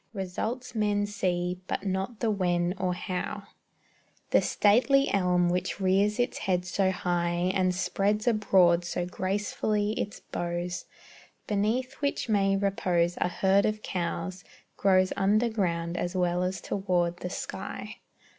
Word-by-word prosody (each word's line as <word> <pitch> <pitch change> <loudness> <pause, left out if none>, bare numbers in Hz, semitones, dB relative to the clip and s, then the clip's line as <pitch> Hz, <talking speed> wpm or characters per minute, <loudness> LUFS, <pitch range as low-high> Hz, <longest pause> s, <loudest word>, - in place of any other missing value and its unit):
Results 215 +6 -4
men 205 -2 +1
see, 180 -3 -2
but - - -3
not 190 +4 -2
the 230 -2 +2
when, 175 -3 +1
or 180 -1 0
how. 185 +3 -4 0.9
The - - +5
stately 255 +7 +3
elm 180 -2 +3
which 180 +3 -1
rears 195 +2 +2
its 245 +1 0
head 180 -1 0
so 190 +1 +1
high, 175 -1 0
And 185 -2 +1
spreads 205 +4 0
abroad 190 -6 +4
so 175 0 -2
gracefully 205 +3 -1
its 210 -1 -4
boughs, 175 +1 -4 0.6
Beneath 220 +6 0
which 285 -3 -1
may 195 -2 +3
repose 180 -3 +1
a - - +1
herd 190 +3 +2
of 215 0 -3
cows, 180 +1 -3 0.3
Grows 185 -1 +3
under 210 +4 +2
ground 170 -5 -1
as 175 +1 -2
well 180 -1 +1
as 185 +1 -2
toward 175 -3 0
the 180 - -5
sky. - - -6
190 Hz, 135 wpm, -28 LUFS, 180-205 Hz, 0.9 s, The